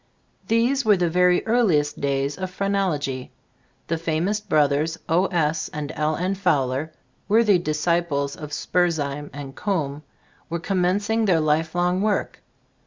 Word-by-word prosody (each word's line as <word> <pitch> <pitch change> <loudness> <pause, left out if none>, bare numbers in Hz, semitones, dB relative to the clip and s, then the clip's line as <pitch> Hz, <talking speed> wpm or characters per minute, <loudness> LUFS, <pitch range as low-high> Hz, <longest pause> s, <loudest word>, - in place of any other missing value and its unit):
These 240 +5 +2
were 210 -3 +4
the 175 -2 0
very 180 +1 +3
earliest 180 -11 +2
days 140 0 0
of 185 -1 -4
phrenology. 185 -9 -2 0.5
The 165 - -1
famops 165 +6 -1
brothers, 150 +2 +2
O. 175 +4 +2
S. 155 -3 0
and 150 0 -4
L. 155 +1 0
N. 180 +4 -1
Fowler, 155 -6 0 0.4
worthy 210 -3 +4
dis 155 -2 -3
ciples 165 -5 0
of 150 - -8
Spurzheim 150 -4 -1
and 140 -1 -8
Coombe, 150 -8 -2 0.5
were 170 - -2
commencing 200 +5 0
their 180 -5 +3
lifelong 165 +4 +1
work. 210 0 -1
165 Hz, 135 wpm, -23 LUFS, 150-190 Hz, 0.5 s, were